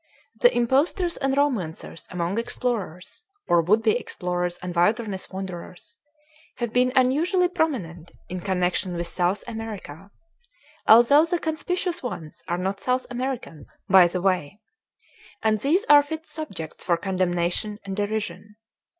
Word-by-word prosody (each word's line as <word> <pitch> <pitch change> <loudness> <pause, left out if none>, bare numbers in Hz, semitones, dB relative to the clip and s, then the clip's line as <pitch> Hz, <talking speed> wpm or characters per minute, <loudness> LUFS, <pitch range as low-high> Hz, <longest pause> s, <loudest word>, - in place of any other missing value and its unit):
The - - +6
impostors 290 +9 +1
and 270 0 0
romancers 205 - -2
among 180 +4 -2
explorers 230 - -4 0.2
or 170 -1 +4
would 210 +7 +2
be 220 - +4
explorers 180 -1 -3
and 180 -1 -6
wilderness 205 +2 0
wanderers 185 -1 -8 0.6
have 240 -2 -3
been 250 +1 +3
unusually 315 +8 +3
prominent 230 - -2 0.2
in 185 - -5
connection 180 0 0
with 170 0 -2
South 175 +3 0
America 215 -7 -7 0.8
(although 240 +7 +7
the 345 +1 0
conspicuous 345 +3 -2
ones 165 - -7
are 175 -1 -1
not 190 +2 -2
South 255 +4 0
Americans, 245 - -5 0.2
by 185 -2 +7
the 180 +1 -4
way); 185 -1 0 0.8
and 215 -1 +2
these 315 - +1
are 290 0 +8
fit 315 +2 -6
subjects 195 - -7
for 170 -2 +2
condemnation 185 +2 -1
and 195 -1 -4
derision. 210 0 -3
210 Hz, 135 wpm, -24 LUFS, 180-260 Hz, 0.8 s, are